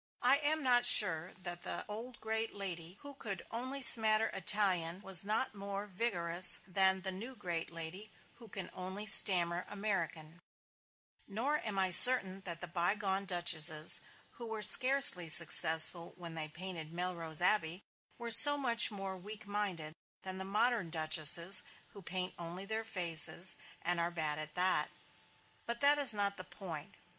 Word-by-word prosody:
I 280 - +1
am 305 +1 -3
not 245 -2 0
sure 180 -8 +3
that 175 -1 -6
the - - -8
old 225 +3 -12
great 220 0 -7
lady 180 -2 -8
who 285 0 -14
could 200 -9 -9
only 260 +4 -7
smatter 220 -2 +5
Italian 185 -2 -2
was 190 -2 +1
not 215 +5 -5
more 200 0 -10
vigorous 180 -4 +1
than 190 0 0
the 190 - -2
new 230 +8 -11
great 175 -6 -8
lady 170 +6 -8 0.3
who 230 - -16
can 195 -2 -11
only 190 +3 -10
stammer 180 -4 +4
American; 175 -5 -8 0.9
nor 255 +9 -5
am 210 -3 -9
I 190 -1 -1
certain 195 -3 +9
that 170 -2 -7
the 175 - -7
bygone 190 +3 -5
duchesses 170 -3 +1 0.3
who 235 - -13
were 220 -1 -9
scarcely 255 - +5
successful 165 +1 +2
when 170 -2 -12
they 160 -1 -4
painted 165 -1 -9
Melrose 170 -3 -6
Abbey, 180 -1 -2 0.3
were 235 -1 -7
so 290 +5 +4
much 235 -4 +3
more 195 -3 -9
weak 210 +3 -14
minded 195 -7 -7 0.3
than 190 0 -9
the - - -7
modern 210 0 -4
duchesses 160 +3 +1 0.3
who 200 - -17
paint 185 0 -6
only 175 +3 -11
their 220 +2 -7
own 225 - -12
faces, 175 -2 -1 0.3
and 175 0 -3
are 170 0 -3
bad 155 -3 -5
at 155 0 -8
that. 185 +1 -1 0.8
But 235 0 -8
that 290 +1 0
is 275 -5 +5
not 200 -1 -4
the 185 - -10
point. 175 -4 -13
190 Hz, 160 wpm, -29 LUFS, 170-215 Hz, 0.9 s, certain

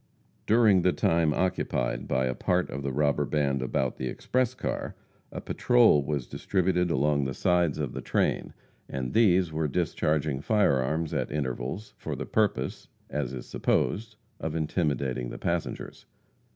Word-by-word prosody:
During 110 -4 +5
the 90 - +3
time 80 -2 +2
occupied 70 -8 -1
by 65 0 +1
a 65 - 0
part 90 +6 0
of 70 - -4
the 70 -1 -2
robber 75 +1 +1
band 70 -2 0
about 65 0 -1
the 65 - -3
express 130 - -1
car, - - -4 0.4
a - - -5
patrol 120 -11 +4
was 70 -3 -2
distributed 90 -2 0
along 75 -2 +2
the 65 -1 -3
sides 90 -4 +2
of - - -3
the - - -5
train, - - 0 0.4
and 65 -1 -4
these 95 -6 +4
were 80 0 0
discharging 75 -3 0
fire 105 -7 +3
arms 80 +5 -1
at - - -1
intervals, 70 - -3
for - - -4
the - - -5
purpose, 105 -2 -1 0.2
as 75 -4 -2
is 65 -2 -6
supposed, 110 +1 0 0.2
of 80 0 -3
intimidating 70 -6 -1
the - - -7
passengers. 85 -1 -4
75 Hz, 155 wpm, -28 LUFS, 70-90 Hz, 0.4 s, During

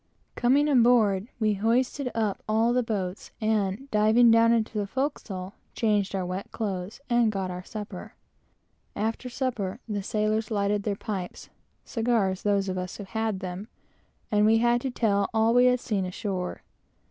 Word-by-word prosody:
Coming 270 +5 +3
aboard, 230 -7 +4
we 215 -2 +2
hoisted 245 +6 0
up 215 -3 -1
all 225 +2 +3
the 250 - +3
boats, 200 -4 -4
and 215 +2 0
diving 220 +3 +5
down 230 0 +5
into 225 -2 0
the 205 - -2
forecastle, 200 -7 -3 0.2
changed 205 -3 +1
our 185 -1 -1
wet 185 +2 -5
clothes, 200 -1 -4
and 240 -2 +3
got 190 -2 -3
our 180 0 -6
supper. 210 +2 -8 0.8
After 225 +4 -2
supper 240 -5 -3
the 205 -2 -2
sailors 215 +2 -1
lighted 205 -1 0
their 205 0 -2
pipes, 195 -3 -6 0.4
(cigars, 225 -5 0
those 200 -1 +1
of 185 -1 -2
us 180 0 -5
who 205 - -6
had 220 0 -2
them,) 185 +3 -5 0.6
and 210 -1 +3
we 225 +1 +5
had 240 +1 +2
to 265 - -2
tell 205 -5 +1
all 220 +1 +3
we 245 +1 +5
had 250 0 +4
seen 210 -6 -1
ashore. 185 -1 -4
215 Hz, 160 wpm, -27 LUFS, 195-235 Hz, 0.8 s, diving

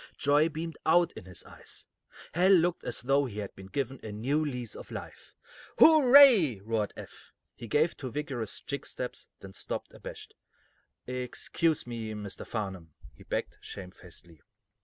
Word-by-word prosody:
Joy 145 +2 +4
beamed 160 0 -6
out 175 +2 +4
in 105 - -10
his 90 -2 -7
eyes. - - -10 0.5
Hal 180 +2 +4
looked 175 -2 +4
as - - -4
though 140 +2 +3
he 110 -5 -7
had 100 -2 -5
been 95 - -11
given 135 +3 -3
a 110 - -7
new 135 +9 0
lease 125 -6 -4
of - - -10
life. - - -9 0.4
"Hooray!" 260 - +8
roared 110 0 -1
Eph. - - -11 0.2
He 115 - -9
gave 150 +8 +2
two 130 - -6
vigorous 130 -5 -3
jig 140 -1 -5
steps, 125 - -5
then 95 -1 -10
stopped, - - -5
abashed. - - -9 0.7
"Excuse 125 +5 -1
me, 115 -2 -5
Mr. 105 -2 -7
Farnum," 95 -8 -5 0.2
he - - -19
begged, - - -4
shamefacedly. 90 -4 -10
125 Hz, 155 wpm, -30 LUFS, 105-155 Hz, 0.7 s, Hooray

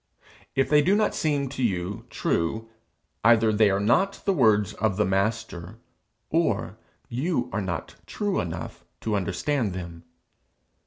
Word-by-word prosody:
If 135 -1 +2
they 150 -1 +5
do 185 +7 +3
not 215 0 +2
seem 145 -3 0
to 130 0 -6
you 95 -4 -1
true, 110 +7 -1 0.5
either 115 -1 +5
they 105 -1 +4
are 95 0 +1
not 155 - +3
the 195 - +3
words 110 - +3
of 100 -2 -1
the 105 - +3
Master, 100 -1 -2 0.5
or 110 - 0 0.3
you 135 +4 -1
are 100 - 0
not 95 -2 -4
true 205 -2 -1
enough 85 0 -5 0.2
to 110 -2 -1
understand 100 +4 -1
them. 85 -2 -7
110 Hz, 145 wpm, -26 LUFS, 95-140 Hz, 0.5 s, they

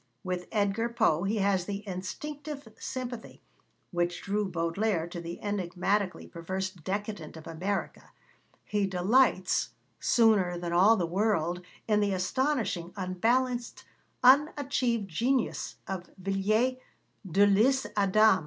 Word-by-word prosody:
With 180 -1 -3
Edgar 210 +2 +1
Poe 175 -7 +2
he 205 +3 0
has 195 -3 +1
the 205 +1 -5
instinctive 285 +9 -6
sympathy 245 -3 -6 0.5
which 175 -1 -1
drew 205 0 -1
Baudelaire 170 +2 0
to 170 0 -7
the 170 +1 -7
enigmatically 195 0 -1
perverse 190 +3 -4
Decadent 190 -1 -5
of 160 - -11
America; 185 +5 -4 0.5
he 205 -2 0
delights, 190 +3 +2 0.2
sooner 205 -7 +3
than 175 0 -4
all 195 +6 +6
the 175 - 0
world, 180 -2 0 0.3
in 210 -2 +3
the 205 -1 +1
astonishing, 205 - -1
unbalanced, 240 +7 0 0.4
unachieved 260 -4 +3
genius 235 +8 -1
of 185 -2 -5
Villiers 205 +7 +1 0.5
de 200 +5 +5
l'Isle 230 +7 +3
Adam. 205 0 +5
200 Hz, 115 wpm, -29 LUFS, 180-230 Hz, 0.5 s, all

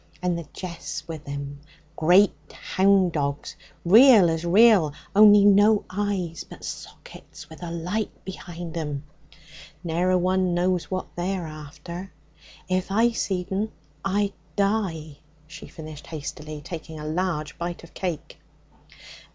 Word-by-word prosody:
And 180 -1 0
the 170 -3 -6
jeath's 175 -2 -6
with 160 -3 -8
him, 140 0 -6 0.3
great 180 +5 +5 0.2
hound 190 -1 +2
dogs, 140 -2 -3 0.3
real 215 -2 +8
as 165 0 -2
real, 185 -4 +5 0.2
only 205 -1 +8
no 205 +1 +5
eyes, 185 -4 -2
but - - -13
sockets - - -10
with 160 - -12
a 175 - -5
light 180 +6 -2 0.2
behind 175 -3 -7
'em. 150 -4 -3 0.8
Ne'er 175 +2 0
a 185 - +4
one 185 0 +1
knows 180 0 0
what 185 -1 -4
they's 185 +2 -2
after. 155 +3 -8 0.6
If 185 0 -1
I 230 +4 +3
seed 190 -5 -2
'em 210 +3 -1 0.3
I'd 200 +1 0 0.2
die,' 190 -8 -1 0.3
she 165 +3 -11
finished 155 -3 -10
hastily, 155 -1 -7
taking 160 0 -8
a 150 - -7
large 155 -1 -2
bite 170 0 -4
of 170 - -14
cake. 175 -5 -5
175 Hz, 135 wpm, -25 LUFS, 160-195 Hz, 0.8 s, real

